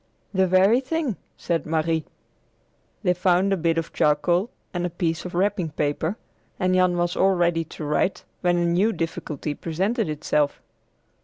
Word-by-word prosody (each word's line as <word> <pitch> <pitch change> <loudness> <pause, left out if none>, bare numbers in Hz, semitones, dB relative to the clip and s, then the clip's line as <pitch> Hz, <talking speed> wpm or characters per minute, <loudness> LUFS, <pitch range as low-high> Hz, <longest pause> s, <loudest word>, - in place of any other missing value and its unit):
"The 190 -1 +3
very 190 +6 +5
thing," 275 - -2 0.2
said 170 -2 -2
Marie. 160 0 0 1.0
They 180 -3 +3
found 185 +2 +2
a - - +3
bit 165 -2 0
of 165 - -3
charcoal 170 +8 +2 0.2
and 175 -1 -2
a 175 - 0
piece 165 -1 -2
of 180 - -6
wrapping 190 -2 +1
paper, 155 +6 -1 0.4
and 185 0 +2
Jan 185 -1 +3
was 175 0 0
all 190 0 +3
ready 170 -2 +2
to 155 - -9
write 150 +6 0 0.2
when 175 -1 +2
a 175 - +1
new 185 +6 +2
difficulty 155 -3 -3
presented 190 - -1
itself. 150 -1 0
175 Hz, 160 wpm, -24 LUFS, 160-190 Hz, 1.0 s, very